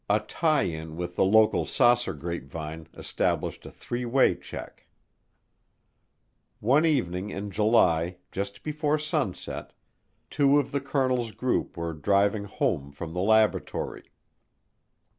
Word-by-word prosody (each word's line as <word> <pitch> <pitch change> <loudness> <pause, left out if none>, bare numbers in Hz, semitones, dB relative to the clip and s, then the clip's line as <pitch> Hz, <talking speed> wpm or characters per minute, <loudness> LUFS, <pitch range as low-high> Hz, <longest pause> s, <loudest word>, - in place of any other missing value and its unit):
A 105 +1 +4
tie 155 +7 +1
in 80 -3 -5
with 90 0 -4
the - - +3
local 110 +3 +4
saucer 120 -5 +2
grapevine 80 0 -6
established - - -2
a - - -7
three 120 +1 -5
way 125 +3 +3
check. - - -10 1.7
One 140 +9 +3
evening 100 - 0
in 100 +1 -5
July, 90 -5 +3
just 100 +1 -5
before 150 0 0
sunset, 150 - -3 0.6
two 140 0 +4
of 140 -2 0
the 140 - -1
colonel's 130 -4 0
group 125 -7 -1
were 85 0 -3
driving 100 +6 +1
home 70 -7 -1
from 80 +3 -7
the 90 - -2
laboratory. 110 +1 +1
105 Hz, 125 wpm, -27 LUFS, 85-130 Hz, 1.7 s, A